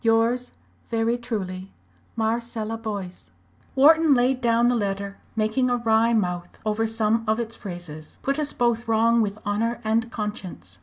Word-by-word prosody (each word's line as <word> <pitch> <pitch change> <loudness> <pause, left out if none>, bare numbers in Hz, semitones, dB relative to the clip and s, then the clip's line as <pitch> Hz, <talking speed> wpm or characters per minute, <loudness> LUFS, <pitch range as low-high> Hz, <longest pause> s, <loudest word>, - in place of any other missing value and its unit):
"Yours 230 +2 +2 0.4
very 230 0 +1
truly, 195 -6 -5 0.4
"MARCELLA 225 0 -2
BOYCE." 200 - -6 0.5
Wharton 310 +2 +6
laid 250 +1 +2
down 235 0 +3
the 245 - +3
letter, 200 -2 -2 0.2
making 220 +4 +1
a 245 - +2
wry 230 0 +3
mouth 180 -5 -1
over 215 +1 +1
some 225 0 +1
of 220 +1 +2
its 230 -1 -4
phrases. 175 -5 -8
"'_Put 275 +2 0
us 295 -1 -1
both 235 -1 0
wrong 230 +1 +4
with 205 -1 -1
honour 225 +3 0
and 225 +2 +1
conscience.' 180 - -6
225 Hz, 150 wpm, -24 LUFS, 205-235 Hz, 0.5 s, Wharton